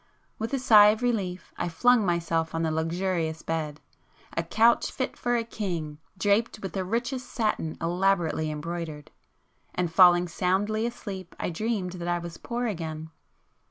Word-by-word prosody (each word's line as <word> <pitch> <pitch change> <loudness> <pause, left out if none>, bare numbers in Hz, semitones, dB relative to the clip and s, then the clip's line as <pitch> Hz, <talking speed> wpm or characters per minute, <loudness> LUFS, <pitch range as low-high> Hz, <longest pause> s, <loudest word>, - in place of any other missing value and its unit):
With 225 +1 -3
a 275 - +1
sigh 220 -5 +7
of 215 +3 +2
relief 195 -7 -2
I 175 - -1
flung 240 +7 +4
myself 165 -2 0
on 165 - 0
the 160 - 0
luxurious 165 0 -1
bed,—a 160 +1 -6
couch 225 +7 +3
fit 260 - -3
for 245 0 0
a 235 - +1
king, 170 -10 -4 0.2
draped 205 +4 +1
with 195 -3 -6
the 190 - -1
richest 240 +6 -2
satin 210 -8 -1
elaborately 170 -2 +1
embroidered,—and 165 +2 -6
falling 175 -1 +7
soundly 205 +6 0
asleep 195 -6 -7
I - - -2
dreamed 205 0 -2
that 170 - -4
I 175 0 +1
was 170 -1 -7
poor 240 +1 -3
again. 160 -6 -4
180 Hz, 150 wpm, -27 LUFS, 165-215 Hz, 0.2 s, sigh